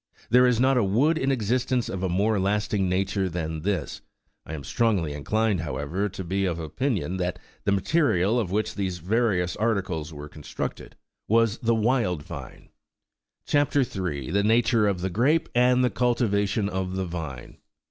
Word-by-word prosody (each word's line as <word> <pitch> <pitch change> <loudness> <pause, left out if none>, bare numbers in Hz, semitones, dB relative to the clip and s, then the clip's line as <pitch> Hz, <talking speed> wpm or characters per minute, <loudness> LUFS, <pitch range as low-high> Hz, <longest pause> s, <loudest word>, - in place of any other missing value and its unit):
There 125 +1 +6
is 120 -2 +2
not 130 +1 +4
a - - +2
wood 135 +12 +2
in 135 +1 +1
existence 125 +1 0
of 95 - -4
a 95 - 0
more 100 +4 +1
lasting 100 0 0
nature 95 +1 0
than 80 -2 -4
this; 100 +2 -2 0.5
I 80 - -5
am 70 - -7
strongly 95 - 0
inclined, 105 +7 0
however, 85 +6 -2
to 95 0 -7
be 95 +3 -1
of 85 -3 -1
opinion 95 - -2
that 90 -1 -2 0.3
the - - +2
material 110 - +2
of 105 -7 -2
which 105 +3 -1
these 95 -3 -2
various 95 -1 0
articles 95 -8 -1
were 75 -1 -8
constructed 75 0 -6 0.3
was 115 0 +2
the 115 0 +2
wild 110 - +1
vine. - - -10 0.8
CHAP. 145 -1 +1
3. 90 - -1
THE 100 +2 +2
NATURE 115 0 +3
OF 95 -3 -1
THE 95 +1 -2
GEAPE, 145 - +2
AND 125 +1 +4
THE 125 - +2
CULTIVATION 105 -3 +1
OP 95 -1 -3
THE 95 0 -2
VINE. 80 -8 -7
100 Hz, 170 wpm, -25 LUFS, 90-115 Hz, 0.8 s, There